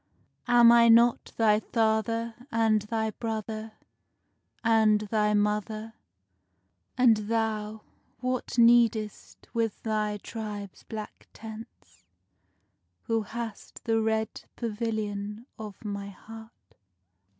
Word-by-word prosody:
Am 240 -1 +7
I 235 0 +6
not 235 +1 +4
thy 215 -2 +4
father 225 +1 0 0.2
and 225 -1 +3
thy 220 +1 -2
brother, 220 0 -5 0.9
And 220 -2 +4
thy 210 0 +1
mother? 210 +2 -1 1.0
And 245 -3 +5
thou 215 0 -2 0.4
what 255 -1 -3
needest 230 -3 +3
with 225 -3 -1
thy 215 -1 -1
tribe's 205 -2 -7
black 215 -2 -8
tents 215 - -12 1.0
Who 225 -1 0
hast 225 +1 -7
the 225 -1 +1
red 220 0 -1
pavilion 215 -1 -3
of 215 0 -9
my 200 -1 -4
heart? 225 +3 -12
220 Hz, 95 wpm, -28 LUFS, 210-230 Hz, 1.0 s, Am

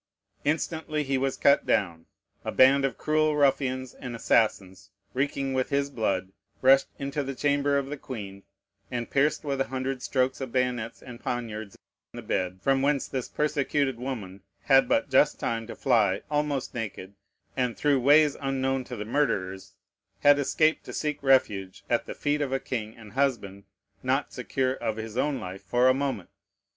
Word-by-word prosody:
Instantly 155 0 -1
he 135 -1 -1
was 135 0 -1
cut 140 - +4
down. 85 -3 0 0.4
A - - -3
band 135 +1 +5
of 135 - -2
cruel 155 0 +1
ruffians 130 -3 +1
and 125 -2 -7
assassins, 105 -5 +1 0.2
reeking 135 0 -1
with 130 -1 0
his 140 0 0
blood, 95 -6 -1 0.3
rushed 135 +1 +6
into 140 +1 -3
the 135 -1 -4
chamber 145 0 +1
of 140 - 0
the 145 +2 -6
queen, 100 -8 -8 0.5
and 120 -2 -4
pierced 145 +2 +2
with 140 -2 -1
a - - +2
hundred 130 0 -3
strokes 130 0 0
of 130 -3 -4
bayonets 125 -3 -1
and 120 -2 -10
poniards 110 -5 -5 0.4
the - - -8
bed, 90 0 -2
from 135 -1 +3
whence 140 0 +1
this 130 -3 -4
persecuted 145 -3 0
woman 105 -7 -6 0.2
had 135 -1 +5
but - - +2
just - - +4
time 115 -1 -2
to - - -7
fly 105 -7 +2
almost 145 -2 -1
naked, 105 -4 -6 0.4
and, 125 -3 -1
through 145 -2 +2
ways 145 +3 +5
unknown 135 -1 0
to 125 - -7
the 105 -2 -5
murderers, 100 -8 -1 0.5
had 145 0 +6
escaped 155 +3 +2
to - - -8
seek 150 -1 -2
refuge 105 -9 +2
at 120 - +1
the - - -6
feet 150 0 0
of 140 -2 -1
a 135 - 0
king 110 -5 -5
and 105 -3 -13
husband 110 -8 -1 0.4
not - - 0
secure 130 -1 -1
of 115 -4 -3
his 110 0 -6
own 135 +1 0
life 95 +1 -7
for 125 +1 +2
a 130 - +6
moment. 130 -9 -3
130 Hz, 175 wpm, -27 LUFS, 115-140 Hz, 0.5 s, rushed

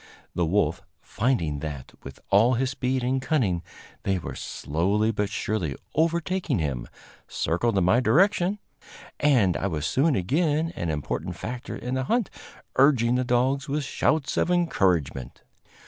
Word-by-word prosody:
The 85 -2 0
wolf, 100 +5 +1 0.2
finding 95 - -1
that, 70 -3 -6
with 70 - -10
all 115 +6 +5
his 130 +2 0
speed 130 -1 -1
and 130 +2 0
cunning, 115 - +1 0.4
they 95 -1 0
were 90 - -6
slowly 100 +9 -1
but 105 -2 -1
surely 95 -8 -2 0.2
overtaking 170 - 0
him, 70 -7 -2 0.4
circled 100 +6 0
in 95 - +3
my 95 +7 +4
direction, 190 +7 +3 0.6
and 120 -11 +3
I 100 - -1
was 80 -5 -3
soon 140 +2 +2
again 155 - 0
an 85 - -3
important 75 -3 -3
factor 125 +2 -6
in 125 +1 -5
the 130 0 -1
hunt, 235 - 0 0.5
urging 130 -4 +4
the 125 0 +1
dogs 130 +3 +1
with 145 +1 -1
shouts 140 +1 0
of - - +2
encouragement. 90 - 0
120 Hz, 145 wpm, -25 LUFS, 90-140 Hz, 0.6 s, all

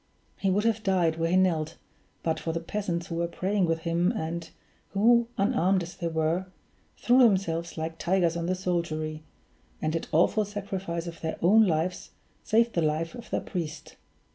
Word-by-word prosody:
He 195 - +1
would 200 +3 +2
have 225 -1 +1
died 180 -5 +2
where 165 0 +1
he 180 - +3
knelt, 165 -4 +1 0.5
but 160 -1 0
for 165 - -3
the 165 - -1
peasants 170 -1 -3
who 165 - -5
were 170 0 0
praying 185 +2 0
with 165 0 0
him, 170 +3 +1
and 170 -4 -4 0.4
who, 235 +4 +4
unarmed 195 -3 +2
as 170 - -9
they 170 - -3
were, 165 +3 0 0.5
threw 245 +2 +4
themselves 185 -8 +2
like 160 0 -4
tigers 175 -2 +2
on 170 0 -2
the 185 - +1
soldiery, 160 -4 -2 0.6
and 155 +1 -1
at 165 - -3
awful 180 +7 +3
sacrifice 195 -4 -4
of 170 -1 -8
their 160 -1 -3
own 215 +4 +6
lives 175 +2 -1 0.3
saved 230 +1 +2
the 170 - +1
life 155 +1 0
of 240 -1 -10
their - - -1
priest. 165 -4 -5
170 Hz, 180 wpm, -27 LUFS, 165-195 Hz, 0.6 s, own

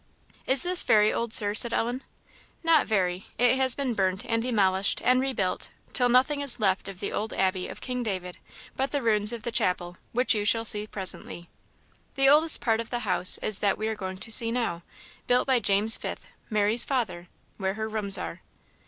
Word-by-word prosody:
"Is 265 0 +3
this 360 0 +5
very 210 -1 +3
old, 235 -1 -3
Sir?" 205 -2 +2
asked 230 +3 +3
Ellen. 240 +4 -2 0.6
"Not 325 -3 +3
very; 185 -3 -2
it 245 +2 +3
has 260 -1 +5
been 270 -4 -2
burnt, 190 -2 -2
and 230 0 -1
demolished, 200 -5 0
and 255 +1 +3
rebuilt, 255 -9 -2 0.2
till 245 -2 +2
nothing 265 +4 +2
is 260 -4 +1
left 195 -2 -1
of 190 -2 -11
the 200 - -5
old 215 +1 -4
Abbey 185 -1 -1
of - - -11
King 250 -1 -4
David 185 -5 -5 0.4
but 270 +1 -2
the 285 -3 -3
ruins 210 -1 +1
of 235 -2 -7
the 235 - -4
chapel, 175 -3 -1
which 250 +2 +2
you 210 -2 -2
shall 225 +2 +2
see 210 -1 +1
presently. 185 -3 -4 0.7
The 270 -1 +2
oldest 310 +2 +4
part 225 -2 0
of 230 - -6
the 240 -1 -4
House 185 -2 +5
is 215 - -1
that 200 -1 0
we 215 - -3
are 220 - -3
going 190 -2 -7
to 225 +4 -6
see 230 +1 +4
now, 230 -9 -3 0.5
built 245 0 +2
by 260 -2 +2
James 205 +1 +4
Fifth, - - -8 0.2
Mary's 215 +1 +2
father, 220 -10 -3 0.3
where 190 -1 -3
her 220 0 -4
rooms 210 -2 +1
are." - - -7
220 Hz, 200 wpm, -26 LUFS, 195-250 Hz, 0.7 s, this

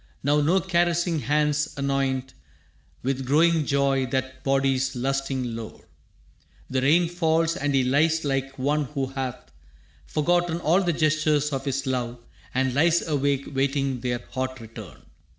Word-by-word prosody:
Now 145 +2 +3
no 170 +6 +3
caressing 175 -2 +1
hands 150 0 0
anoint 135 -1 -1 0.7
With 135 +1 -1
growing 155 +3 +3
joy 140 -1 +2
that 130 +1 -3
body's 135 -1 +1
lusting 130 -1 -2
lore. 115 -1 -9 0.8
The 130 0 +1
rain 165 +6 +4
falls, 165 -1 +1
and 145 -5 -1
he 135 - +3
lies 155 +5 +2
like 135 -1 -2
one 145 +3 0
who 135 0 -3
hath 130 -1 -5 0.6
Forgotten 175 +2 +1
all 170 +6 +3
the 175 -2 +1
gestures 155 -1 +1
of 135 +1 -3
his 135 0 -2
love 125 -2 -2 0.3
And 130 0 0
lies 165 +5 +3
awake 140 -2 0
waiting 135 -1 0
their 120 0 -3
hot 130 +1 -3
return. 110 - -11
140 Hz, 140 wpm, -25 LUFS, 130-155 Hz, 0.8 s, rain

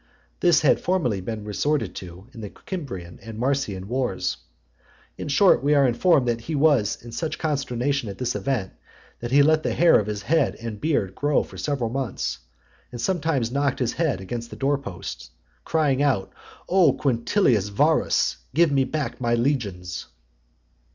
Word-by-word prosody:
This 175 -2 +4
had 145 - +4
formerly 130 - 0
been 105 +2 -5
resorted 110 0 -1
to 90 +1 -9
in 115 - -9
the 105 - -6 0.2
Cimbrian 95 - -6
and 115 -1 -9
Marsian 125 -7 -1
wars. 125 +3 -1 0.8
In - - -6
short, 150 +2 +4
we 145 +1 +3
are 140 -1 +5
informed 135 +2 +3
that 115 -1 0
he 155 +6 -4
was 140 -8 +3
in 120 - -9
such 160 +6 -3
consternation 140 -4 -1
at 100 - -7
this 125 -1 -1
event, 125 -9 -2 0.5
that 120 - -5
he 140 +3 +5
let 155 +1 +4
the - - -2
hair 170 0 +6
of 105 - -3
his 105 -1 -4
head 155 +4 +2
and 115 -2 -7
beard 120 - 0
grow 145 +6 +1
for - - -13
several 135 -6 -1
months, 130 -5 -3 0.5
and 120 - -7
sometimes 155 -7 0
knocked 140 0 0
his 125 -2 -1
head 160 -9 0
against 115 +5 -5
the - - -9
door 140 +1 0
posts, 90 - -7 0.4
crying 145 -4 +1
out, 130 -10 +1 0.3
"O, 185 -1 +4
Quintilius 120 - +1
Varus! 100 -9 +2 0.2
Give 165 -1 +4
me 135 -1 +3
back 145 0 -4
my 120 -1 +2
legions!" 105 -9 -2
130 Hz, 170 wpm, -24 LUFS, 110-145 Hz, 0.8 s, hair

